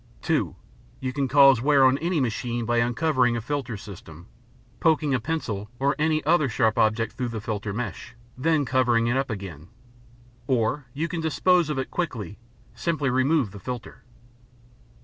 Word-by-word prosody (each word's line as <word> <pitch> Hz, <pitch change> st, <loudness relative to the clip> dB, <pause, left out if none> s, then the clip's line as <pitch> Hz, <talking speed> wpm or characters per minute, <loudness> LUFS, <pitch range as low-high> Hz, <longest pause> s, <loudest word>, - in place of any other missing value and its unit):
(2) -, -, 0 dB, 0.4 s
You 130 Hz, -1 st, -3 dB
can 140 Hz, 0 st, 0 dB
cause 135 Hz, -3 st, +6 dB
wear 140 Hz, 0 st, +5 dB
on 130 Hz, +2 st, +4 dB
any 170 Hz, 0 st, 0 dB
machine 120 Hz, -1 st, -2 dB
by 120 Hz, +1 st, +1 dB
uncovering 125 Hz, 0 st, +2 dB
a -, -, -1 dB
filter 125 Hz, -2 st, -3 dB
system, 85 Hz, -5 st, -11 dB, 0.5 s
poking 155 Hz, -3 st, +2 dB
a 130 Hz, -, +2 dB
pencil 110 Hz, -8 st, -3 dB
or 140 Hz, +3 st, +1 dB
any 155 Hz, 0 st, +1 dB
other 155 Hz, -3 st, +3 dB
sharp 110 Hz, 0 st, +1 dB
object 110 Hz, +1 st, +1 dB
through 125 Hz, +1 st, -3 dB
the 115 Hz, -2 st, -4 dB
filter 105 Hz, -1 st, -4 dB
mesh, 120 Hz, +2 st, -5 dB, 0.2 s
then 150 Hz, +2 st, +1 dB
covering 120 Hz, -2 st, +2 dB
it 120 Hz, +2 st, +1 dB
up 135 Hz, 0 st, 0 dB
again. 95 Hz, -8 st, -7 dB, 0.8 s
Or, 130 Hz, +2 st, 0 dB
if 120 Hz, -, -19 dB
you 165 Hz, -, +1 dB
can 170 Hz, 0 st, -4 dB
dispose 170 Hz, +1 st, +2 dB
of 150 Hz, -, -2 dB
it 130 Hz, -, -3 dB
quickly, 110 Hz, -, -4 dB, 0.3 s
simply 150 Hz, -6 st, -1 dB
remove 130 Hz, -2 st, +2 dB
the 100 Hz, -, -10 dB
filter. 125 Hz, +1 st, -7 dB
130 Hz, 170 wpm, -25 LUFS, 115-150 Hz, 0.8 s, cause